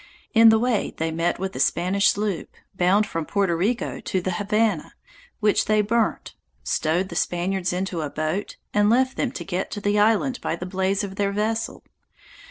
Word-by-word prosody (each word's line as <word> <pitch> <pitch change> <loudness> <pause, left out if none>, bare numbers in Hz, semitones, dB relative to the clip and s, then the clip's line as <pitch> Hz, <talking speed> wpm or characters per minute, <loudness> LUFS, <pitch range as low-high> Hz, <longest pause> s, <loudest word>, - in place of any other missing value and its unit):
In 225 -1 +8
the 220 - +5
way 235 -2 0
they 160 0 -1
met 165 +2 0
with 190 +1 -4
a - - -4
Spanish 190 +4 +2
sloop, 205 -4 -2 0.2
bound 190 +3 +3
from 165 -5 -3
Porto 195 +1 0
Rico 205 +9 -1
to 190 - -2
the 185 +1 -2
Havana, 205 -1 0 0.5
which 210 -1 +3
they 215 0 +3
burnt, 225 +2 0 0.3
stowed 170 +4 0
the 170 - -7
Spaniards 180 +1 -1
into 180 -1 -2
a 150 - -3
boat, 155 +7 -3 0.2
and 205 0 +3
left 260 +3 +2
them 260 - -1
to - - -6
get 185 0 -3
to - - -5
the 205 +1 +1
island 225 +5 +2
by - - -1
the 175 - -6
blaze 190 +2 0
of 195 -1 -6
their 200 -1 +1
vessel. 220 +2 -2
200 Hz, 185 wpm, -24 LUFS, 180-215 Hz, 0.5 s, In